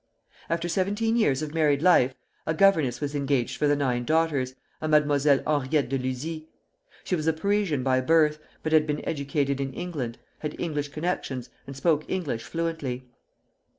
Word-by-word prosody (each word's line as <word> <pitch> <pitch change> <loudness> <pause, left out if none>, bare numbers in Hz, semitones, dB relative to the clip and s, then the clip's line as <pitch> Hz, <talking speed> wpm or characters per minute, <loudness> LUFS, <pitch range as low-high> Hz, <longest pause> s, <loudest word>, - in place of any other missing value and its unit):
After 170 +1 -1
seventeen 205 +6 0
years 155 - +2
of 150 -1 -5
married 150 -2 +2
life 135 -8 +5 0.3
a 160 - +1
governess 155 -10 +3
was 145 -1 -3
engaged 140 -4 0
for 150 - +2
the 145 - +4
nine 125 -4 0
daughters, 145 -4 +1 0.3
a 155 - -1
Mademoiselle 145 -2 +3
Henriette 145 -2 +1
de 135 0 0
Luzy. 150 +5 -4 0.6
She 185 - 0
was 155 -2 -3
a 160 - +4
Parisian 185 -4 0
by 130 -1 +2
birth, 150 +1 +3 0.2
but 155 - -2
had 155 -1 +5
been 150 0 -3
educated 140 -2 -1
in 135 -1 -2
England, 145 -10 -4 0.2
had 150 -1 -5
English 150 -4 -2
connections, 145 -5 -3 0.2
and 135 0 -8
spoke 155 0 +2
English 150 -11 -2
fluently. 160 -7 -3
150 Hz, 165 wpm, -26 LUFS, 135-165 Hz, 0.6 s, life